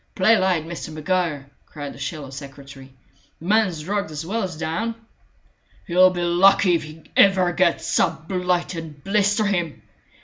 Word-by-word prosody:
"Play 205 Hz, +5 st, +5 dB
light, 185 Hz, -6 st, +1 dB
Mr. 165 Hz, -1 st, -7 dB
Maguire!" 155 Hz, -3 st, -2 dB, 0.2 s
cried 145 Hz, -2 st, -7 dB
the -, -, -14 dB
sallow 140 Hz, 0 st, -5 dB
secretary. 135 Hz, -1 st, -11 dB, 0.5 s
"The 165 Hz, -, -12 dB
man's 195 Hz, -6 st, +1 dB
drugged, 200 Hz, 0 st, -2 dB
as 155 Hz, +1 st, -6 dB
well 220 Hz, +6 st, -2 dB
as 180 Hz, -5 st, -4 dB
down." 175 Hz, +9 st, -2 dB, 0.9 s
"He'll 185 Hz, +1 st, +5 dB
be 175 Hz, -1 st, -3 dB
lucky 180 Hz, +2 st, +4 dB
if 170 Hz, -, +1 dB
he 155 Hz, +1 st, -11 dB
ever 185 Hz, -3 st, +4 dB
gets 185 Hz, -2 st, +1 dB
up, 160 Hz, -1 st, 0 dB
blight 180 Hz, -1 st, -1 dB
and 160 Hz, -4 st, -8 dB
blister 205 Hz, +2 st, +1 dB
him!" 175 Hz, -6 st, -2 dB
175 Hz, 160 wpm, -22 LUFS, 155-190 Hz, 0.9 s, Play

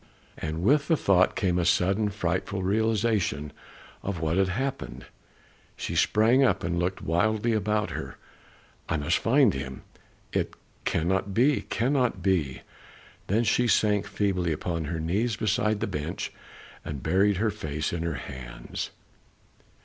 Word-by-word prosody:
And 80 Hz, +2 st, -4 dB
with 140 Hz, +7 st, +3 dB
the 165 Hz, -, +3 dB
thought 95 Hz, -6 st, +3 dB
came 90 Hz, -3 st, +1 dB
a -, -, +1 dB
sudden 95 Hz, +5 st, +2 dB
frightful 95 Hz, 0 st, -2 dB
realization 105 Hz, -, +1 dB, 0.5 s
of 95 Hz, -4 st, -3 dB
what 80 Hz, +1 st, 0 dB
had 95 Hz, -1 st, +3 dB
happened. 135 Hz, +8 st, -3 dB, 0.7 s
She -, -, -4 dB
sprang 115 Hz, +5 st, +4 dB
up 95 Hz, -8 st, +2 dB
and 85 Hz, +1 st, -1 dB
looked 90 Hz, +2 st, -2 dB
wildly 110 Hz, +7 st, +1 dB
about 105 Hz, 0 st, 0 dB
her. -, -, -6 dB, 0.7 s
"I 80 Hz, -, +1 dB
must 75 Hz, +4 st, +1 dB
find 130 Hz, -2 st, +4 dB
him! 65 Hz, -1 st, -6 dB, 0.5 s
It -, -, -1 dB, 0.3 s
cannot, 95 Hz, +4 st, 0 dB, 0.3 s
cannot 125 Hz, -6 st, +1 dB
be!" 85 Hz, -9 st, 0 dB, 0.6 s
Then 110 Hz, +5 st, +2 dB
she 120 Hz, +3 st, +2 dB
sank 105 Hz, -3 st, +2 dB
feebly 90 Hz, -4 st, 0 dB
upon 85 Hz, +1 st, -2 dB
her 80 Hz, +2 st, -3 dB
knees 100 Hz, +8 st, 0 dB
beside 105 Hz, 0 st, 0 dB
the -, -, +1 dB
bench, 80 Hz, +6 st, -4 dB, 0.5 s
and 70 Hz, -4 st, -6 dB
buried 100 Hz, +1 st, +3 dB
her 110 Hz, +2 st, +1 dB
face 75 Hz, -7 st, -3 dB
in 85 Hz, -, -2 dB
her 85 Hz, -2 st, -2 dB
hands. -, -, -6 dB
95 Hz, 140 wpm, -27 LUFS, 85-110 Hz, 0.7 s, sprang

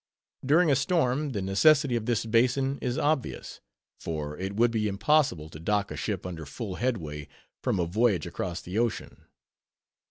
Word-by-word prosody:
During 155 Hz, +4 st, +4 dB
a -, -, +5 dB
storm, 145 Hz, -1 st, +1 dB
the 100 Hz, -3 st, -2 dB
necessity 140 Hz, +7 st, +4 dB
of 115 Hz, -1 st, -2 dB
this 115 Hz, -2 st, 0 dB
basin 125 Hz, +4 st, +2 dB
is 125 Hz, +2 st, -2 dB
obvious; 150 Hz, -3 st, -2 dB, 0.4 s
for 75 Hz, -2 st, -4 dB
it 95 Hz, +3 st, -5 dB
would 120 Hz, +2 st, +3 dB
be 110 Hz, -2 st, 0 dB
impossible 100 Hz, -, +1 dB
to 75 Hz, -, -10 dB
"dock" 100 Hz, +4 st, 0 dB
a -, -, -4 dB
ship 100 Hz, -5 st, -3 dB
under 85 Hz, -3 st, -6 dB
full 90 Hz, -, -6 dB
headway 80 Hz, -, -3 dB, 0.3 s
from -, -, 0 dB
a 85 Hz, -, +1 dB
voyage 100 Hz, -1 st, +1 dB
across 85 Hz, -2 st, -4 dB
the 95 Hz, +5 st, -3 dB
ocean. 120 Hz, -2 st, -3 dB
110 Hz, 165 wpm, -27 LUFS, 90-130 Hz, 0.4 s, a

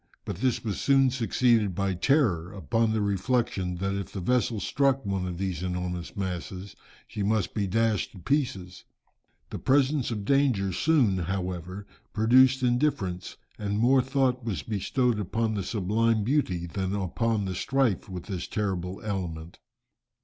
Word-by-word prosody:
But -, -, -4 dB
this 125 Hz, +3 st, 0 dB
was 105 Hz, -4 st, -3 dB
soon 135 Hz, -2 st, +4 dB
succeeded 115 Hz, -5 st, +2 dB
by 100 Hz, 0 st, 0 dB
terror, 90 Hz, -, +1 dB
upon 110 Hz, +5 st, 0 dB
the 110 Hz, -1 st, 0 dB
reflection 100 Hz, -2 st, 0 dB
that 95 Hz, +2 st, -2 dB
if 100 Hz, -1 st, -4 dB
the 100 Hz, -, -5 dB
vessel 120 Hz, +3 st, +1 dB
struck 135 Hz, +5 st, +1 dB
one 95 Hz, -2 st, -1 dB
of 90 Hz, -1 st, -5 dB
these 95 Hz, -3 st, -3 dB
enormous 90 Hz, -1 st, -4 dB
masses, 95 Hz, +1 st, -5 dB, 0.3 s
she 105 Hz, -, -5 dB
must 105 Hz, -1 st, 0 dB
be 100 Hz, -3 st, -1 dB
dashed 110 Hz, +1 st, 0 dB
to -, -, -12 dB
pieces. 95 Hz, -, -2 dB, 0.7 s
The -, -, -4 dB
presence 140 Hz, 0 st, +2 dB
of 105 Hz, -4 st, -4 dB
danger 125 Hz, -8 st, +2 dB
soon, 120 Hz, -, +2 dB
however, 90 Hz, +1 st, -4 dB, 0.3 s
produced 130 Hz, +4 st, +5 dB
indifference, 120 Hz, -8 st, 0 dB, 0.2 s
and 105 Hz, -1 st, -2 dB
more 130 Hz, +4 st, +4 dB
thought 130 Hz, -1 st, 0 dB
was 110 Hz, -6 st, -3 dB
bestowed 115 Hz, +3 st, 0 dB
upon 110 Hz, +3 st, -1 dB
the 100 Hz, -, -2 dB
sublime 110 Hz, +2 st, +1 dB
beauty, 100 Hz, -, 0 dB
than 95 Hz, +3 st, -3 dB
upon 105 Hz, +3 st, -1 dB
the 95 Hz, -, -3 dB
strife 130 Hz, +1 st, 0 dB
with 90 Hz, -2 st, -6 dB
this 95 Hz, -4 st, -5 dB
terrible 95 Hz, -3 st, -3 dB
element. 85 Hz, -6 st, -5 dB
105 Hz, 150 wpm, -27 LUFS, 95-125 Hz, 0.7 s, produced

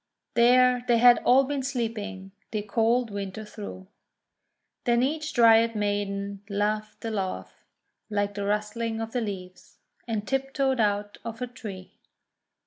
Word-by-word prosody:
There 250 Hz, +1 st, +5 dB
they 240 Hz, -, +4 dB
had 240 Hz, +1 st, +7 dB
all 260 Hz, +2 st, +6 dB
been 280 Hz, 0 st, -2 dB
sleeping 220 Hz, -7 st, -4 dB, 0.2 s
the 215 Hz, -1 st, -3 dB
cold 225 Hz, +3 st, +1 dB
Winter 200 Hz, +1 st, -5 dB
through. 205 Hz, -3 st, -8 dB, 1.0 s
Then 240 Hz, -1 st, +3 dB
each 305 Hz, +3 st, -1 dB
Dryad 230 Hz, -1 st, +5 dB
Maiden 200 Hz, -1 st, -2 dB
laughed 210 Hz, +2 st, -2 dB
a 225 Hz, -, -2 dB
laugh 195 Hz, -3 st, -5 dB, 0.4 s
like 205 Hz, -1 st, -1 dB
the 200 Hz, -1 st, -3 dB
rustling 210 Hz, +2 st, -1 dB
of 225 Hz, 0 st, -4 dB
the 245 Hz, -, -1 dB
leaves, 185 Hz, -4 st, -7 dB, 0.3 s
and 215 Hz, -2 st, -3 dB
tiptoed 270 Hz, -1 st, 0 dB
out 205 Hz, -1 st, 0 dB
of 230 Hz, -1 st, -6 dB
her 250 Hz, -, -3 dB
tree. 210 Hz, -6 st, -9 dB
220 Hz, 135 wpm, -27 LUFS, 205-245 Hz, 1.0 s, had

